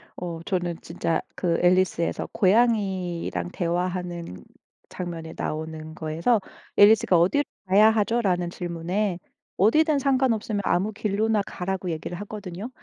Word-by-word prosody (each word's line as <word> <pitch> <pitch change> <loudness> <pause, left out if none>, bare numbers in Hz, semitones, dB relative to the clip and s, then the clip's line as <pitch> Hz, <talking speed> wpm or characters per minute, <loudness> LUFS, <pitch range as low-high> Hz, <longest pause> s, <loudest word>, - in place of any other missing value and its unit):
어 170 -2 -5
저는 175 -3 -1
진짜 165 -1 -2
그 170 -2 0
앨리스에서 180 -1 +2
고양이랑 190 - +1
대화하는 175 - -3 0.5
장면이 165 -2 -6
나오는 155 0 -5
거에서 165 +9 +1 0.4
앨리스가 205 -4 +6
"어디로 190 +13 +3 0.2
가야 200 +3 +6
하죠?" 225 +2 +1
라는 180 -4 0
질문에 175 +2 -2 0.4
"어디든 305 - +4
상관없으면 255 -6 +1
아무 195 +5 +1
길로나 210 +1 0
가."라고 185 0 -3
얘기를 165 +2 -5
하거든요. 205 0 -7
185 Hz, 315 characters per minute, -25 LUFS, 170-210 Hz, 0.5 s, 앨리스가